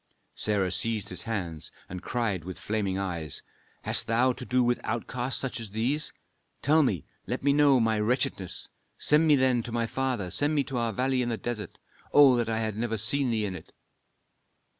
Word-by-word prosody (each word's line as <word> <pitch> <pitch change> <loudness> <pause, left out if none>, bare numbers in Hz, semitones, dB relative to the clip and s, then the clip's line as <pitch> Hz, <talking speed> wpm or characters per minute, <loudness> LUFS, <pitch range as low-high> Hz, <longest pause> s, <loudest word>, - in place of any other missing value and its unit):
Sarah 100 -4 0
seized 105 +2 -1
his 90 - -6
hands 90 -9 -4 0.2
and 90 0 -7
cried 110 -8 -1
with 95 +1 -7
flaming 100 -3 -2
eyes, 85 -6 -2 0.4
"Hast - - +2
thou 120 +3 +3
to 125 - -8
do 125 0 +3
with 120 0 +1
outcasts 120 +3 -1
such 135 -3 -2
as 115 -2 -6
these? 120 +9 -1 0.5
Tell 155 +4 +5
me 100 - 0 0.2
let - - -3
me 140 0 +4
know 145 -2 +5
my 110 -2 +2
wretchedness; 110 -4 -1 0.3
send 150 +2 +3
me 150 - +7
then 130 -3 +3
to 120 - -7
my 115 0 0
father, 120 -7 -2
send 145 +2 +2
me 145 - +3
to 135 -1 -5
our 115 -1 0
valley 130 +4 +1
in 120 - -1
the 115 - -1
desert. 110 -6 -5 0.3
Oh, 140 -3 +7
that 120 -1 0
I 110 0 0
had 110 -2 -2
never 110 0 -1
seen 125 +6 0
thee 110 -2 0
in 95 - -3
it!" 80 - -11
115 Hz, 195 wpm, -28 LUFS, 105-130 Hz, 0.5 s, me